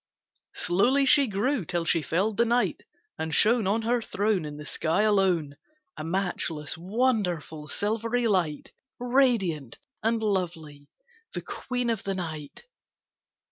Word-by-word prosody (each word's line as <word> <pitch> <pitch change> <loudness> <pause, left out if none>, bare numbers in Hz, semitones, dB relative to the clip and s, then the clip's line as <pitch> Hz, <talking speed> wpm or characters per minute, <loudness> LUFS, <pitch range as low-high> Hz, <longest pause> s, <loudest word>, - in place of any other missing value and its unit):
Slowly 250 +10 +3
she 275 0 +5
grew 225 +4 0
till 170 0 -2
she 165 0 +2
filled 195 +7 0
the 235 - +4
night, 240 +1 +1 0.4
And 160 -1 -1
shone 220 +2 +3
On 220 +3 +1
her 240 +1 +1
throne 205 -5 0
In 150 0 -7
the 150 - -8
sky 165 +7 0
alone, 185 -9 +2 0.4
A 155 - -6
matchless, 165 -4 -2
wonderful, 180 - -1
silvery 230 +7 -1
light, 180 -9 0 0.3
Radiant 235 - +1 0.2
and 225 0 0
lovely, 165 -8 -2 0.5
the - - -4
Queen 245 -2 -2
of 225 - -2
the 195 -1 -2
night. 160 - -6
195 Hz, 135 wpm, -27 LUFS, 160-230 Hz, 0.5 s, she